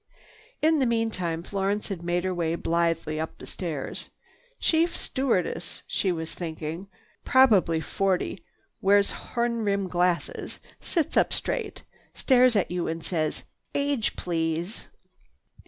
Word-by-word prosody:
In 315 0 +5
the 260 - +3
meantime 200 -8 0
Florence 200 +3 -1
had 190 -4 -4
made 175 +1 0
her 185 0 0
way 170 -2 0
blithely 165 -2 0
up 160 - -4
the - - -10
stairs. 160 -7 -4 0.5
"Chief 330 +1 +2
stewardess," 185 -10 -1
she 190 - 0
was 160 -2 -4
thinking, 165 +2 -5 0.4
"probably 210 -11 +5
forty, 185 0 -1 0.4
wears 200 +1 +4
horn 235 -1 -2
rim 200 -2 +1
glasses, 175 -2 0 0.2
sits 330 -5 -1
up - - +4
straight, 450 -4 -2 0.3
stares 255 -2 +5
at 200 - +2
you 180 -1 -1
and 165 0 -3
says, 155 -4 -1 0.3
'Age 280 -5 0
please? 165 +2 -2
185 Hz, 125 wpm, -27 LUFS, 165-230 Hz, 0.5 s, In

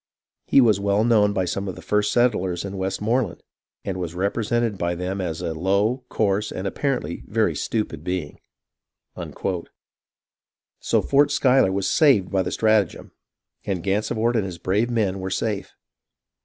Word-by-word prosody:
He 135 - +6
was 110 -5 +4
well 100 +1 +2
known 110 -3 +4
by 95 -2 0
some 100 +3 -3
of 95 - -4
the - - -10
first 105 0 +1
settlers 95 -8 +1
in 100 0 -6
Westmoreland, 105 +3 -1 0.4
and 95 -2 -3
was 90 -2 -4
repre 100 +5 -1
sented 115 -2 0
by 85 0 -1
them 95 +2 -3
as 80 -3 -3
a 80 - -2
low, 100 +9 0
coarse, 105 0 0
and 95 - -5
apparently 125 -3 -2
a - - -18
very - - +2
stupid 105 -9 -3
being." 90 -4 -4 2.4
So - - +1
Fort 145 +1 +3
Schuyler 130 -8 +3
was 95 0 -1
saved 135 - +4
by 95 -1 +2
the 95 - -2
stratagem, 110 -5 +1 0.5
and 95 -4 -3
Gansevoort 110 +4 0
and 110 - +2
his 90 -3 -6
brave 105 +7 0
men 105 -5 0
were 95 0 -4
safe. 100 +1 -3
100 Hz, 160 wpm, -23 LUFS, 95-115 Hz, 2.4 s, He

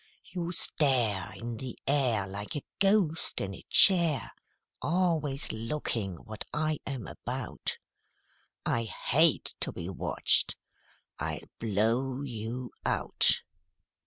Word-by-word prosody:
You 175 -2 -4
stare 125 - +2
In 115 -1 -6
the 130 +1 -7
air 130 -8 +2
Like 100 +5 -6
a 145 - -4 0.2
ghost 195 -5 +1
in 100 0 -4
a - - -11
chair, 170 - +6 0.5
Always 155 -3 0
looking 115 -4 -2
what 110 +5 -9
I 155 0 -1
am 130 -6 -4
about; - - -4 0.9
I 115 0 0
hate 155 +8 +2
to - - 0
be 85 - -6
watched 95 - +3 0.6
I'll - - -3 0.2
blow 115 +5 0
you 120 0 -5
out." - - +3
130 Hz, 110 wpm, -29 LUFS, 110-155 Hz, 0.9 s, chair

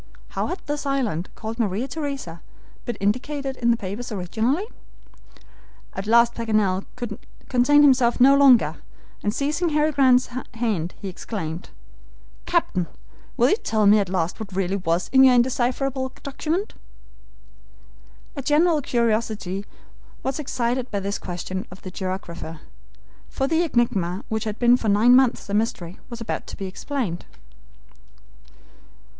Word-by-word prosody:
How - - -2
had 365 - -5
this 295 -1 -3
island, 235 - -1
called 225 +2 -6
Maria 220 +3 0
Theresa, 275 - -5 0.4
been 240 - -3
indicated 265 +7 -2
in 235 - +1
the 235 - +4
papers 210 +4 -6
originally? 220 - -1 1.3
At 195 +2 -5
last 235 +1 +5
Paganel 215 -5 0
could 240 -4 -5 0.3
contain 285 +4 +5
himself 255 -4 +4
no 270 +3 +7
longer, 275 -4 +5 0.4
and 205 - 0
seizing 300 +8 0
Harry 305 0 +2
Grant's 260 -3 +4 0.3
hand, 210 -8 -1
he 200 - -6
exclaimed: 180 -3 -5 0.8
"Captain! 190 - +1 0.5
will - - +4
you - - +5
tell 220 - 0
me 210 +1 +7
at 195 -3 -1
last 175 -2 -1
what 200 -4 -7
really 190 0 0
was 175 -1 0
in 265 0 +7
your 260 -1 +7
indecipherable 260 +2 0
document?" 320 +8 -2 1.6
A 280 - -4
general 305 +3 +3
curiosity 215 -5 -1 0.6
was 265 +2 -2
excited 250 -2 -1
by 200 - -2
this 200 +1 -3
question 185 +1 -5
of 185 0 -13
the 185 - -7
geographer, 175 -4 -5 0.7
for 270 - -1
the 325 +3 +2
enigma 235 - 0
which 220 0 -2
had 215 0 -3
been 240 0 +5
for 225 - -1
nine 220 +5 +6
months 260 -2 +3
a 200 - -5
mystery 195 -5 -1
was 235 -2 -7
about 230 - -4
to - - -8
be 195 - -5
explained. 190 -1 -4
235 Hz, 140 wpm, -23 LUFS, 195-265 Hz, 1.6 s, no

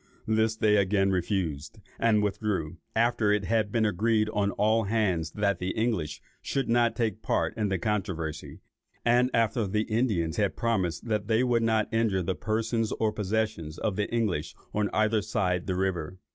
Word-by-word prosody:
This 110 0 +1
they 105 -1 +3
again 95 0 +2
refused, 85 -5 -2 0.2
and 110 -2 +3
withdrew; 100 -6 -2 0.2
after 115 -2 +2
it 105 -1 +1
had 110 +1 +1
been 115 -1 +2
agreed 110 +2 +1
on 105 -2 0
all 110 +2 +2
hands 95 -7 0
that 100 -3 0
the 90 +1 -3
English 95 -10 -1 0.2
should 135 -1 -2
not 120 0 +2
take 115 -4 0
any - - -34
part - - 0
in 105 -2 -1
the 95 - 0
controversy, 85 -5 -3 0.4
and 120 +1 +4
after 115 -1 +1
the 105 +3 0
Indians 110 -8 0
had 100 -2 0
promised 95 -7 -1
that 105 -3 -1
they 115 +2 +3
would 120 -2 +2
not 110 -2 +2
injure 110 -5 +1
the 95 - -1
persons 110 +2 -1
or 110 -1 0
possessions 105 -7 -2
of 105 - -1
the 105 - -2
English 105 -10 -1 0.2
on 105 -1 0
either 110 0 +2
side 90 -4 -1
the 95 - 0
river. 95 -3 -2
105 Hz, 175 wpm, -28 LUFS, 95-110 Hz, 0.4 s, and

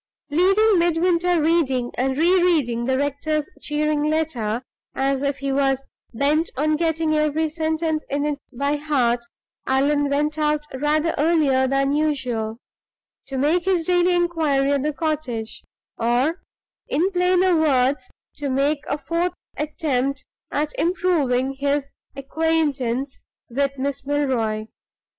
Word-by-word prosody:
Leaving 390 +5 +4
Midwinter 345 +1 +2
reading 270 -7 +1
and 265 +1 -1
re 350 +4 +4
reading 265 -10 +1
the 260 +1 +1
rector's 290 +2 -1
cheering 300 0 0
letter, 295 -7 -1 0.3
as 270 0 0
if 280 -1 -1
he 275 0 -3
was 270 -1 +1 0.3
bent 295 +7 +1
on 305 +2 +2
getting 320 -1 0
every 305 +1 +1
sentence 315 0 -1
in 285 +1 -1
it 295 -1 -2
by 280 +4 -1
heart, 250 -6 +1 0.4
Allan 285 +2 +2
went 300 +2 0
out 300 0 +1
rather 300 +4 +1
earlier 290 -5 +3
than 275 +1 +1
usual, 255 -7 -1 0.7
to 270 -1 -4
make 320 +6 +2
his 365 -4 +1
daily 355 0 +3
inquiry 315 -6 +1
at 280 -1 +1
the 300 +2 0
cottage 290 -8 -3 0.4
or, 245 +9 +1 0.5
in 350 +7 +1
plainer 360 0 +3
words, 270 -4 +2 0.3
to 290 -2 -3
make 280 +3 +1
a - - -1
fourth 340 +3 -1 0.2
attempt 280 -3 -2 0.2
at 300 +1 -2
improving 305 -8 +1
his 280 0 0 0.2
acquaintance 275 -3 -1 0.3
with 275 +2 -1
Miss 280 +1 -3
Milroy. 255 -7 0
290 Hz, 130 wpm, -22 LUFS, 270-320 Hz, 0.7 s, Leaving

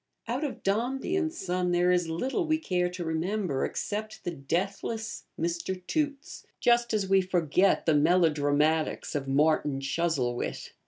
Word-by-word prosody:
Out 250 +6 -2
of 285 - -4
'Dombey 250 - 0
and 330 -4 0
Son' 180 - -1
there 175 +1 +3
is 175 -2 +1
little 265 - -1
we 315 0 +3
care 180 - 0
to 180 -1 -5
remember 165 -2 -1
except 215 +1 -4
the 175 - -2
deathless 195 +9 -3
Mr. 170 +3 -2
Toots; 290 - -2 0.2
just 240 0 +3
as 210 -3 0
we 195 0 +4
forget 180 0 +2
the 160 - +4
melodramatics 155 -1 +2
of 140 -2 -2
'Martin 145 0 +2
Chuzzlewit.' 135 -4 -1
180 Hz, 145 wpm, -28 LUFS, 160-220 Hz, 0.2 s, we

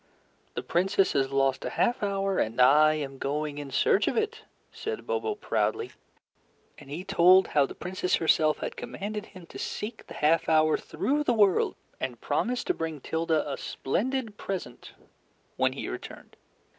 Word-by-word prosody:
"The - - -3
Princess 190 +2 +2
has 135 -1 +1
lost 135 -1 +1
a - - -2
half 245 - +1
hour 195 -1 0
and 115 +3 -1
I 150 +5 +6
am 135 -3 -5
going 145 +1 -2
in 145 -1 -6
search 195 +9 +2
of - - 0
it," 445 +1 -1 0.3
said 445 +1 -5
Bobo, 430 - -1
proudly. 430 0 -1 0.9
And 145 -3 -14
he 160 +6 -5
told 185 0 +5
how 145 -2 +3
the - - -10
Princess 180 0 -1
herself 155 -2 +3
had - - -4
commanded 210 +2 -5
him 185 -4 -13
to - - -10
seek 220 +2 -5
the - - -10
half 160 +3 +2
hour 155 -1 +4
through 295 +3 -1
the 245 -5 +1
world, 205 -4 +3 0.2
and 120 -3 -4
promised 245 +1 -1
to 365 - +1
bring 160 - -4
Tilda 160 +1 0
a 140 - -3
splendid 225 - -2
present 185 -10 -6 0.6
when - - +1
he - - -5
returned. - - -8
175 Hz, 170 wpm, -28 LUFS, 150-210 Hz, 0.9 s, I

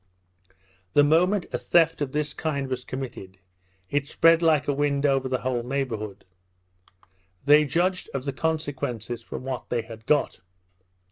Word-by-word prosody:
The 145 - +6
moment 180 +6 +3
a - - -1
theft 165 -2 +3
of 140 -2 -1
this 150 0 -1
kind 140 -4 -2
was 125 -1 -3
committed, 125 -8 -7 0.5
it 145 0 0
spread 165 +2 +4
like 160 -3 +3
the 145 - +1
wind 140 0 0
over 135 -2 +2
the 130 -1 -1
whole 125 -1 -1
neighbourhood. 120 -5 -4 1.2
They 150 +1 +6
judged 180 +6 0
of 135 -1 -4
the 140 - -2
consequences 135 -7 -3
from - - -7
what 130 -1 -5
they 120 -2 -1
had 110 0 -12
got. 150 -2 +1
140 Hz, 150 wpm, -25 LUFS, 125-150 Hz, 1.2 s, The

